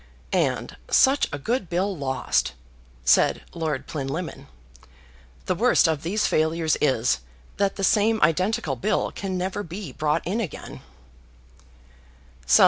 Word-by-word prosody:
"And - - 0
such 270 +2 +4
a 145 - -3
good 210 - -2
bill 190 +3 0
lost," 135 -4 0 0.5
said - - +4
Lord 155 -5 -2
Plinlimmon. 155 +4 -5 1.0
"The - - +1
worst - - +4
of 155 -3 0
these 205 +6 0
failures 160 0 +1
is, 120 - +2 0.4
that 200 -1 +1
the 195 - -4
same 215 +3 +3
identical 180 - +1
bill 130 - 0
can 190 -2 -4
never 185 +2 -2
be 180 -3 -7
brought 150 +3 -1
in 205 +7 -1
again." 185 -10 -7
170 Hz, 125 wpm, -24 LUFS, 150-200 Hz, 1.0 s, such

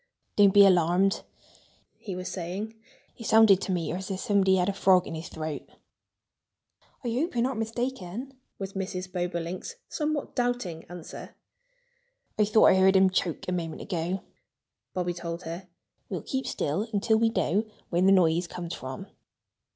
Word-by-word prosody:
"Don't 200 -1 +6
be 200 +1 +8
alarmed!" 180 +1 +3 0.8
he 195 -4 -6
was 180 0 -5
saying. 185 +4 -4 0.4
"It 230 - -6
sounded 220 -4 +6
to 195 - -2
me 175 -3 -1
as 185 +3 -4
if 190 -1 -3
somebody 195 -2 +3
had 180 -1 +2
a 200 - +1
frog 190 -2 +4
in - - -6
his 160 +1 -6
throat." 155 -2 -4 1.4
"I 240 - -1
hope 270 +9 -1
you're 235 - +2
not 255 -2 -1
mistaken," 240 +1 -4 0.2
was 195 -1 -5
Mrs. 185 -1 -4
Bobolink's 175 - -3
somewhat 300 -2 -2
doubting 245 -10 -1
answer. 175 -1 -9 1.0
"I 210 - +5
thought 215 +1 +5
I - - +5
heard 190 +1 +5
him 190 0 +5
choke 175 -3 -1
a - - -1
moment 165 -3 -3
ago," 180 +1 -2 0.7
Bobby 180 -1 -1
told 170 0 -5
her. 170 +3 -6 0.4
"We'll - - -4
keep 265 0 -3
still 185 +10 -1
until 220 +1 +2
we 225 0 +3
know 215 -1 +1 0.3
where 175 0 +2
the 190 +1 +5
noise 175 -2 +4
comes 175 0 -6
from." 130 +8 -6
190 Hz, 160 wpm, -27 LUFS, 175-215 Hz, 1.4 s, be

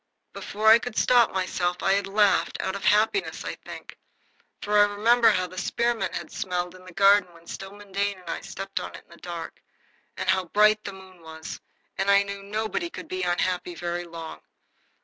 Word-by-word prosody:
Before 215 +1 -5
I 225 +1 +9
could 240 -1 -6
stop 245 -2 +4
myself 180 -1 -1
I 195 - +4
had 200 0 0
laughed, 205 0 +2
out 190 - -2
of 200 - -5
happiness, 220 - +2
I - - -3
think. - - -11 0.6
For 210 0 +3
I 205 - +8
remembered 235 +3 +5
how 185 - 0
the 185 0 -7
spearmint 235 +5 -1
had - - -6
smelled 180 -4 -3
in 185 0 -15
the 185 - -11
garden 195 0 +4
when 170 0 -18
Stillman 200 +3 -9
Dane 200 0 -1
and 180 -1 -17
I 165 - -3
stepped 195 0 -5
on - - -7
it - - -11
in - - -28
the 170 - -14
dark 170 -2 -7 0.6
and - - -4
how 190 0 +2
bright 215 +4 +4
the 200 - -6
moon 190 -2 -14
was, 160 0 -9 0.4
and 195 +1 +1
I 200 0 +6
knew 200 0 -6
nobody 215 - -3
could - - -9
be 185 0 -3
unhappy 180 0 -1
very 175 +1 -3
long. 165 -1 -8
195 Hz, 200 wpm, -26 LUFS, 180-210 Hz, 0.6 s, I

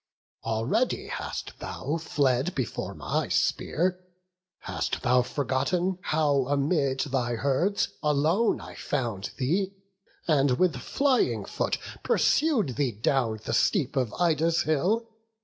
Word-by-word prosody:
Already 115 - 0
hast - - -5
thou 155 +3 -3
fled 140 0 0
before 125 -8 -3
my - - -1
spear; 180 +2 0 0.6
Hast - - -3
thou 125 -1 +4
forgotten 150 +8 -1
how 145 -6 +1
amid 140 -1 +1
thy 125 -4 -1
herds 140 - +1
Alone 155 +9 +2
I - - -10
found 115 -8 -3
thee, 185 +9 0 0.5
and 140 -5 +3
with 180 -3 +2
flying 265 - +1
foot - - -1 0.2
Pursued 240 - +2
thee 140 -4 +1
down 110 0 0
the - - -2
steep 155 - +2
of 125 -5 0
Ida's 165 -1 +2
hill? 190 +10 +1
145 Hz, 115 wpm, -27 LUFS, 130-180 Hz, 0.6 s, thou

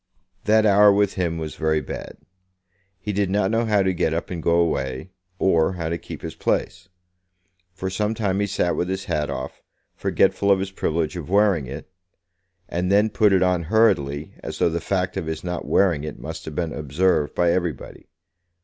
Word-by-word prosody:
That 110 +1 +4
hour 105 0 +6
with 100 0 +2
him 85 -3 -1
was 80 -1 -5
very 80 -1 0
bad. - - -7 0.8
He 105 +2 -4
did 100 -1 0
not 100 0 +1
know 115 +1 +1
how 105 -3 +3
to 95 0 +1
get 80 -2 0
up 85 - -4
and 85 -2 -4
go 85 +1 +2
away, 75 -2 -1 0.3
or 85 -2 +2
how 85 -3 -3
to 85 - -1
keep - - -9
his - - -5
place. 95 -1 -2 0.8
For 95 +1 -5
some 105 +3 -1
time 100 -3 0
he 100 - +1
sat 90 -3 0
with 90 - -1
his 95 +1 -3
hat 75 -1 -1
off, - - -6 0.3
forgetful 100 - +1
of 100 - +6
his 95 0 -4
privilege 80 -2 -1
of 85 -3 -6
wearing 100 -8 +3
it; 70 +4 -8 0.8
and 90 +2 -1
then 105 +2 +4
put 105 -1 +3
it 95 -1 +4
on 90 -1 +2
hurriedly, 80 -10 +2
as - - -6
though - - +3
the 85 0 -3
fact 95 0 -1
of 80 - -3
his 80 -1 -4
not 90 -1 -4
wearing 85 -7 +2
it 75 - -6
must - - -7
have 80 - -7
been 85 -1 -2
observed 75 +1 0
by 85 -1 +3
everybody. 85 -5 -3
90 Hz, 195 wpm, -23 LUFS, 80-100 Hz, 0.8 s, hour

